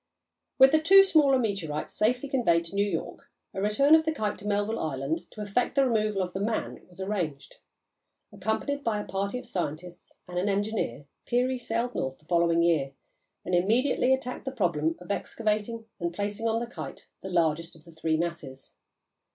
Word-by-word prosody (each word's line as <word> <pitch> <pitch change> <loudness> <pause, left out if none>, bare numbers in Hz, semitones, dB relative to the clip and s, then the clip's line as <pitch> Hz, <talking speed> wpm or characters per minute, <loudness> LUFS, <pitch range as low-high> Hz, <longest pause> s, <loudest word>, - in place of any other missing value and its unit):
With 265 0 +8
the 315 +1 +4
two 390 +5 +8
smaller 300 -8 +4
meteorites 195 -11 -2
safely 245 +6 +1
conveyed 175 -12 +2
to 165 - -9
New 200 +1 +2
York, 165 -4 -5 0.2
a 190 - -3
return 245 +9 +4
of 320 0 +7
the 315 - 0
Kite 215 -9 -2
to 205 - -7
Melville 205 +2 0
Island 155 +3 -3
to 215 - -9
effect 210 +6 -1
the 275 -1 +4
removal 215 -5 +1
of 180 -1 -6
the 190 - -3
"man" 220 +3 -2
was 180 +1 -18
arranged. 180 -8 -3 0.8
Accompanied 280 +6 -2
by 220 -3 0
a 210 - -5
party 200 +4 -2
of 250 - -8
scientists 170 0 -5
and 180 0 -3
an 195 +3 0
engineer, 200 - -1 0.2
Peary 250 +1 +1
sailed 235 +1 -1
north 130 0 -3
the 150 - -26
following 170 0 +3
year 155 -5 +2 0.5
and 180 - -3
immediately 240 +8 +2
attacked 265 0 -1
the 265 - -2
problem 165 - 0
of 180 +2 -7
excavating 220 +2 -2
and 170 -1 -1
placing 205 +2 -2
on 225 0 +1
the 240 - -3
Kite 240 - -9
the 190 - -6
largest 165 -2 0
of 160 - -18
the 170 - -14
three 160 0 -1
masses. 160 -6 -5
205 Hz, 185 wpm, -28 LUFS, 170-240 Hz, 0.8 s, With